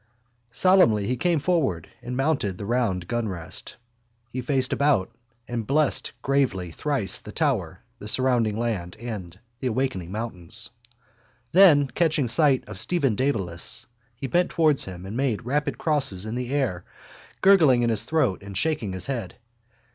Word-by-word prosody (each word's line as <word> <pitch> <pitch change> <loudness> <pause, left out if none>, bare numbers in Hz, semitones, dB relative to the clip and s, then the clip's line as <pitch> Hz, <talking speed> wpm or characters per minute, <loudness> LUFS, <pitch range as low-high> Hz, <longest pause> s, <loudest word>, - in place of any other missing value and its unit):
Solemnly 120 - +4
he 125 - 0
came 170 +4 +1
forward 140 - 0
and 125 +1 -5
mounted 135 - 0
the 100 - -6
round 105 -7 0
gunrest. 95 -8 -4 0.6
He 130 - -3
faced 130 0 +1
about 140 -10 +2 0.4
and 115 -3 -4
blessed 150 +1 +1
gravely 130 -11 0
thrice 130 - -2
the - - -10
tower, - - -1 0.2
the 105 - -8
surrounding 120 -3 +2
land 105 -7 -3
and 100 -7 -7 0.2
the 130 - -2
awaking 110 -8 -2
mountains. 110 0 -6 0.8
Then, 160 -7 +6
catching 155 -6 +2
sight 135 +1 +3
of - - -8
Stephen 145 -9 +1
Dedalus, 100 -4 0 0.3
he 130 - -6
bent 175 +7 +1
towards 155 -4 +2
him 90 -1 -8
and 100 +3 -6
made 120 -4 -1
rapid 145 +4 -1
crosses 135 - 0
in 110 - -4
the 125 0 -3
air, 130 -11 -1 0.6
gurgling 160 -11 +6
in 120 - +2
his 110 - 0
throat 130 -12 0
and 100 -1 -7
shaking 130 -10 -1
his 95 - -2
head. 120 -9 -4
120 Hz, 150 wpm, -25 LUFS, 100-140 Hz, 0.8 s, Then